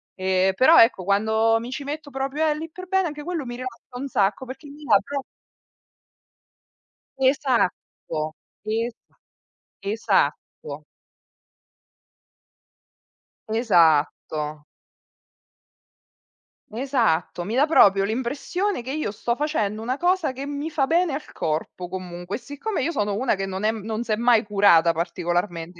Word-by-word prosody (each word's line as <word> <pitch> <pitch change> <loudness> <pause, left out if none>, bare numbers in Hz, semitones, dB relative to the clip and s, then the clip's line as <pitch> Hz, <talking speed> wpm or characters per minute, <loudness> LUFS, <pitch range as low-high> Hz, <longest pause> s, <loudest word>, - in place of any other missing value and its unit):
Ehm, 190 0 +1
però 285 +8 +7
ecco 225 -5 +4
quando 220 +3 +3
mi 235 +2 -7
ci 285 +2 -4
metto 295 0 -5
proprio, 270 +4 -1
eh 300 - +2
lì 325 +1 -6
per 370 +2 -9
bene 380 -1 +2
anche 295 -1 -7
quello 330 -5 -3
mi 240 0 -6
rilassa 250 0 -8
un 280 - -3
sacco 205 +5 +1
perché 265 +4 -9
mi 295 +2 -12
dà 225 -8 +5
pro 280 -2 -4 2.0
Esatto, 240 - 0 0.3
esa 225 +2 -4 0.6
esatto. 190 -7 -1 2.6
Esatto. 155 -7 +2 2.1
Esatto, 220 - 0
mi 220 +4 -3
dà 285 +3 +5
proprio 200 -11 +5
l'impressione 270 - -2
che 260 +3 -6
io 305 -6 -2
sto 235 +3 -2
facendo 220 -9 -1
una 250 +3 -1
cosa 350 -3 +1
che 270 +2 -6
mi 290 +2 -4
fa 295 -3 +1
bene 335 0 +2
al 300 - -6
corpo 160 +3 -3
comunque. 180 +1 -6
Siccome 285 - -4
io 335 - 0
sono 205 -7 -1
una 240 -1 +1
che 195 0 -3
non 190 +1 -5
è 215 - +3
non 220 +1 -4
s'è 220 -3 -1
mai 235 -1 +4
curata 200 -5 +5
particolarmente 175 0 -2
230 Hz, 130 wpm, -24 LUFS, 190-280 Hz, 2.6 s, però